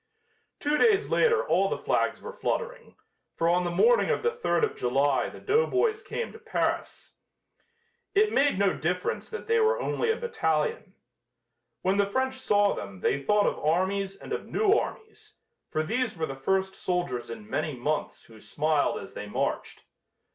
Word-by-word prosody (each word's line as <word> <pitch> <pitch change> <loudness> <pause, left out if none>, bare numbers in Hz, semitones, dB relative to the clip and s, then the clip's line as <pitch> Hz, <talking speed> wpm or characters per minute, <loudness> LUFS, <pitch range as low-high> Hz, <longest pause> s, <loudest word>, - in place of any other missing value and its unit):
Two 295 +1 +1
days 435 -2 +3
later 470 0 +3
all - - +3
the - - -1
flags - - 0
were - - -7
fluttering, 485 0 -3 0.4
for 165 - 0
on 175 +1 +3
the 175 - -1
morning 470 - +4
of - - 0
the 470 - +2
third 470 -1 0
of 445 - +1
July 135 +2 +1
the - - -11
doughboys 435 0 +1
came 475 - -4
to - - -12
Paris. 445 -1 -3 1.0
It 425 +1 +3
made 280 -5 +3
no 195 -1 +2
difference 180 +3 -2
that 445 - -6
they 455 0 +2
were 455 +2 +3
only 465 -2 -1
a 450 - +2
battalion. 185 - -1 0.9
When 190 +2 +2
the 200 0 +3
French 260 +4 0
saw 205 -5 +3
them 100 -2 -8
they 140 - +1
thought 210 +8 +3
of - - 0
armies 190 +5 0
and - - -8
of - - -4
new 420 -2 +2
armies, 440 0 -4 0.3
for 155 -1 -1
these 225 +3 -1
were 160 - -1
the 135 - -6
first 190 +8 0
soldiers 175 -11 -2
in 110 -2 -8
many 150 +4 -2
months 145 +5 -3
who 110 -1 -16
smiled 150 +4 0
as - - -9
they - - -6
marched. - - -3
200 Hz, 175 wpm, -27 LUFS, -, 1.0 s, morning